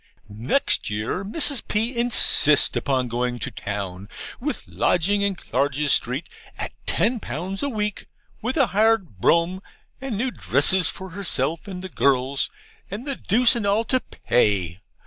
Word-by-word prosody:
Next 120 - 0
year, 105 - -2
Mrs. 275 +4 +2
P. 225 +4 -1
insists 235 -10 +4
upon 130 -2 0
going 120 +1 -2
to 115 - -5
town 100 -2 -6 0.3
with - - -4
lodgings 200 +4 +1
in 200 -1 0
Clarges 140 0 0
Street 130 +7 0 0.3
at - - -5 0.2
ten 235 +1 +2
pounds 180 - -5
a 285 - -1
week, 210 -4 -3 0.3
with 255 +7 -2
a 275 - +5
hired 210 - +1
brougham, 170 - +2 0.4
and 265 -6 -4
new 255 +4 -1
dresses 175 - +3
for 190 -1 -7
herself 180 -1 -1
and 185 -2 -7
the - - -4
girls, 140 -4 +1 0.4
and 210 +7 -6
the 275 -2 -3
deuce 245 +4 +3
and 220 -4 -1
all 205 +3 +2
to 255 +1 +1
pay. 100 - 0
185 Hz, 150 wpm, -23 LUFS, -, 0.4 s, a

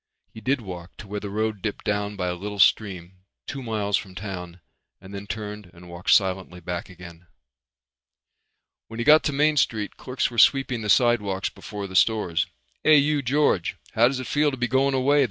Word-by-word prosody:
He 110 - -10
did 130 +4 0
walk 90 -4 -9
to 105 - -10
where 105 +1 -4
the 100 - -6
road 110 0 -2
dipped 105 0 -4
down 105 0 -1
by 90 -2 -3
a 90 - -1
little 100 +3 -6
stream 95 -2 +2 0.3
two 140 - -6
miles 105 -4 0
from 95 -2 -8
town 90 -3 -7 0.4
and 95 +1 -13
then 100 0 -7
turned 105 -2 -6
and 90 +1 -14
walked 85 +1 -6
silently 95 -2 +2
back 90 +1 -5
again. 90 -1 -13 1.6
When 115 - -9
he - - 0
got 155 +1 +7
to 150 - +1
Main 150 +2 +2
Street 110 -6 0
clerks 130 -1 -2
were 120 - -1
sweeping 135 -4 +4
the 105 - -4
sidewalks 105 -4 +2
before 100 +1 -7
the 95 -1 -8
stores. 105 -5 +2 0.4
"Hey, 155 -1 +7
you 145 +1 +2
George. 135 - +1 0.2
How 115 +2 +5
does 130 0 -2
it 130 - -5
feel 150 0 +2
to 135 - -5
be 125 0 0
going 135 +3 +2
away?" 140 +3 +3
105 Hz, 195 wpm, -24 LUFS, 95-130 Hz, 1.6 s, got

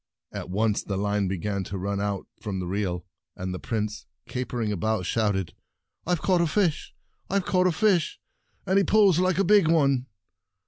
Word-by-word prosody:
At - - -6
once 105 +2 +1
the 100 - -4
line 100 0 0
began 95 +1 -2
to 100 - -5
run 100 +1 -2
out 100 -2 -2 0.2
from 100 -4 -3
the 90 - -3
reel, 90 -1 -2 0.3
and 90 0 -4
the 90 - -5
Prince, 105 -1 -3 0.2
capering 125 -3 -2
about, 110 0 -1
shout 105 0 +1
ed: 95 -3 -3 0.5
"I've 175 -2 0
caught 185 -3 +3
a 170 - +2
fish! 175 -2 0 0.3
IVe 195 -1 0
caught 185 -1 +3
a - - +3
fish— 180 -4 +1 0.5
and 190 +2 +3
he - - +3
pulls 200 -5 +4
like 185 -2 +2
a 195 - +3
big 200 -2 +5
one 140 -5 +3
110 Hz, 185 wpm, -26 LUFS, -, 0.5 s, big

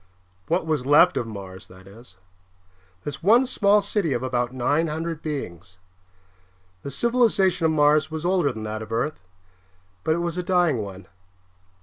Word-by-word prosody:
What 170 0 0
was 150 -5 -1
left 150 +5 +5
of 115 - -2
Mars, 95 -3 -9
that 95 +1 -16
is; 100 0 -16 0.9
this 145 -2 -6
one 230 +8 +5
small 210 -4 +2
city 200 -7 -1
of 120 - -2
about 125 -1 -1
nine 145 +6 0
hundred 160 +1 -4
beings. 90 - -6 1.0
The - - -6
civilization 195 - +2
of - - +1
Mars 150 0 +3
was 160 +1 -5
older 175 -6 +2
than 110 -2 -7
that 110 0 -5
of 110 0 -9
Earth, 120 +7 -2 0.8
but 160 - +1
it 170 0 -2
was 170 +1 -3
a - - 0
dying 175 -7 +1
one. 100 -2 -7
150 Hz, 160 wpm, -24 LUFS, 115-175 Hz, 1.0 s, left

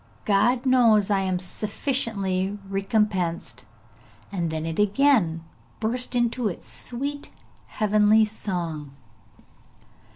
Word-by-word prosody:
God 240 +5 +2
knows 230 -6 +4
I 200 - +3
am 190 -1 0
sufficiently 200 -1 -2
recompensed!' 195 -3 -1 0.7
and 175 -4 -2
then 160 0 -3
it 165 +2 -4
again 205 - +3 0.4
burst 245 +3 -1
into 240 -1 +1
its 185 - -5
sweet 285 +4 -5 0.4
heavenly 215 0 +3
song. 170 -9 -5
210 Hz, 95 wpm, -25 LUFS, 185-235 Hz, 0.7 s, knows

